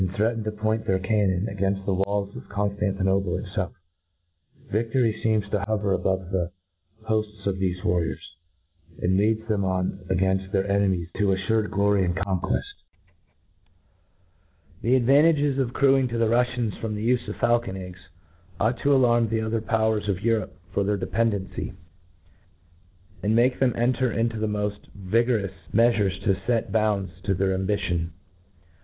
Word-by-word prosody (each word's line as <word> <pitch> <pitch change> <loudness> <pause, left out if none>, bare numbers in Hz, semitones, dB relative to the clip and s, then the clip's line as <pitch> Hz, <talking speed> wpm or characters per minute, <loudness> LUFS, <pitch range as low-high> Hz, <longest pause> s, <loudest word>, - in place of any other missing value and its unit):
threatened 115 +2 0
to 110 - -1
point 110 +1 -1
thfeir 95 -1 +1
cannon, 100 -1 +1
a 100 - -5
gainft 95 0 -1
the 100 - +1
walls 100 +1 -1
of - - -6
Cpnftantinople 100 -2 0
itfelf: 95 -2 -3 1.0
Videry 115 0 +1
feems 110 -2 +2
tp 105 -2 0
hover, 105 -2 0
above 95 -1 -1
the 90 -3 0 0.5
hofts 105 -2 -2
of 100 -1 0
thefe 90 -1 -2
warriors, 85 -2 -1 0.6
and 95 +1 +1
leads 110 +3 +1
them 105 -3 0
on 95 0 -1
againft 95 +1 +1
their 95 0 +1
enemies 100 -4 +1
tp 95 -1 +2
aflu: 110 +3 0
rpd - - -9
glory 100 -1 +2
and 90 -1 0
conqueft* 95 -1 -1 2.2
The 120 +3 +3
advantages 140 +2 +4
accruing 135 +1 +3
to 120 -1 -3
the 115 -1 +2
Ruffians 120 -1 +1
from 110 -2 -3
the 105 +2 -2
ufe 125 -1 +1
of - - -4
faulcon 120 -5 +1
eggs, 90 -1 -8 0.6
ought 115 +3 +1
to 140 0 +3
alarm 120 -3 +3
the 110 0 0
other 110 0 -1
powers 110 -2 0
of 95 -1 -1
Europe 115 -1 0 0.2
for 100 - +1
their 105 +1 +1
independency, 100 0 -2 1.5
and 105 +2 +1
make 125 +2 +3
them 130 -3 +2
enter 125 +1 +1
into 115 0 -1
the 110 - 0
moft 105 -1 -2 0.2
vigorous 105 0 0 0.2
mcafures 105 -4 +2
to 100 - +3 0.2
fct 115 -3 +1
bounds 105 -3 +1
to 100 - +1
their 95 +1 +1
ambition. 95 -4 -1
105 Hz, 150 wpm, -25 LUFS, 95-115 Hz, 2.2 s, advantages